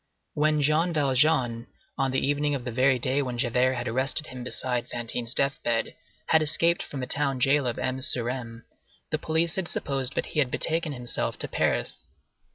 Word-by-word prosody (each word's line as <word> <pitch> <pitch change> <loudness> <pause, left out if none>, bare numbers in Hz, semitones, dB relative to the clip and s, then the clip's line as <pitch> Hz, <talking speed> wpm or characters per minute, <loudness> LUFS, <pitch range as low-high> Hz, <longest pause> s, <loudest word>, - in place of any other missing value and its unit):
When 150 0 +2
Jean 160 +4 +2
Valjean, 130 -4 +2 0.3
on 135 -1 0
the 130 - 0
evening 145 0 +1
of 125 -3 -5
the 125 - -3
very 130 +2 +3
day 130 +3 0
when 125 -3 -3
Javert 125 +2 +2
had 120 0 -3
arrested 130 +6 -1
him 130 -5 -7
beside 125 0 -2
Fantine's 120 0 -3
death 140 0 +1
bed, 115 -1 -1 0.3
had 160 - +4
escaped 165 +3 +3
from 140 - -6
the - - -2
town 140 -1 0
jail 135 +1 +3
of 120 - -2
M. 130 0 -2
sur 120 -2 +1
M., 120 -2 -5 0.5
the - - 0
police 160 +2 0
had 190 -2 -1
supposed 135 -4 -2
that - - 0
he - - +1
had 135 -4 +2
betaken 160 +3 -1
himself 125 -2 -2
to - - -3
Paris. - - -1
135 Hz, 190 wpm, -26 LUFS, 125-150 Hz, 0.5 s, had